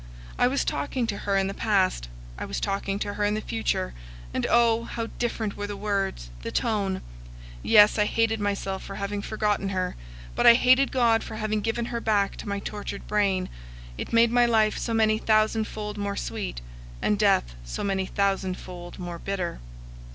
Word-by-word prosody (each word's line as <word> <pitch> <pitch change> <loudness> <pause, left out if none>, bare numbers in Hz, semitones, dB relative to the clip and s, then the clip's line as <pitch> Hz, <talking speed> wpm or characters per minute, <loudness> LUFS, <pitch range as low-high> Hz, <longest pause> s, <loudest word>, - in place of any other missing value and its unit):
I 245 - +5
was 275 +2 0
talking 260 -4 -1
to 210 - -2
her 200 0 0
in 195 - +2
the 195 - -3
past, 190 - +1 0.3
I - - -6
was - - -3
talking 195 - -1
to 205 0 -3
her 205 - -2
in 205 +1 +2
the - - -1
future, 110 - -2 0.4
and - - 0
oh! 230 -1 +4
how 230 -1 -4
different 225 -3 -2
were 205 0 -4
the 205 -1 -5
words, 195 - -2
the - - -5
tone! 200 -5 0 0.6
Yes, 210 - +6
I 210 - +4
hated 225 0 +1
myself 200 -2 -2
for 195 - -8
having 200 +1 -3
forgotten 210 -2 -1
her; 185 -2 -2 0.4
but - - +3
I 235 - +10
hated 255 +2 +4
God 235 -3 +3
for - - -7
having 215 -1 -1
given 225 +2 -1
her 235 - -2
back 205 -3 +1
to - - -7
my 200 - -1
tortured 200 0 -6
brain; 195 -3 +1 0.5
it - - -6
made 230 0 +5
life 235 -3 +4
so 235 - -3
many 215 -1 +3
thousandfold 215 -1 0
more 200 0 -2
sweet, - - -4 0.4
and 210 -1 +1
death 195 - +3
so - - -5
many 190 -1 0
thousandfold 185 -3 -2
more 175 -2 -6
bitter. 190 - -3
205 Hz, 180 wpm, -26 LUFS, 195-220 Hz, 0.6 s, I